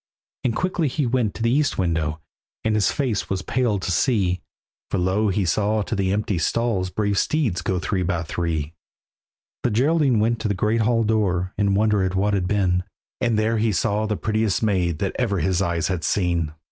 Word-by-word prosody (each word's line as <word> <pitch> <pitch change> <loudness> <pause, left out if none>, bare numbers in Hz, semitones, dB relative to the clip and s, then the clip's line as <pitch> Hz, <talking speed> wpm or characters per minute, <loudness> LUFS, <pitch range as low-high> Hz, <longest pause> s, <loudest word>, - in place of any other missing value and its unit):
And 115 -3 0
quickly 180 -3 0
he 140 +2 -1
went 120 -4 0
to 115 - -4
the 115 - +2
east 145 +2 +1
window, 80 -4 0 0.4
And 110 - +1
his 105 -2 +2
face 125 -8 -1
was 95 -1 -2
pale 120 -4 0
to 95 - -3
see, 90 -2 +1 0.5
For - - -1
lo! 95 +4 +1
he 95 0 0
saw 105 +4 +1
to 110 - -3
the 95 -2 0
empty 100 -3 0
stalls 100 0 0
Brave 100 +1 0
steeds 125 - 0
go 95 +1 -1
three 95 +1 -1
by 90 -2 -1
three. 80 -2 -2 0.9
The - - +1
Geraldine 135 +1 +2
went 115 +1 +1
to 110 - -1
the 100 - 0
great 110 +4 +1
hall 115 +1 +2
door, 95 -4 0
In 100 -1 +1
wonder 105 -1 +2
at 95 0 -1
what 100 +2 +1
had 95 -3 0
been, 90 -3 +1 0.4
And 115 -2 +1
there 110 +1 +1
he 110 0 +2
saw 105 +3 0
the 105 -1 -1
prettiest 110 -1 0
maid 90 -6 +1
That 100 +2 -2
ever 110 -6 +1
his 90 +2 +1
eyes 85 -3 0
had 90 -4 -2
seen. 85 -3 0
100 Hz, 200 wpm, -23 LUFS, 90-110 Hz, 0.9 s, the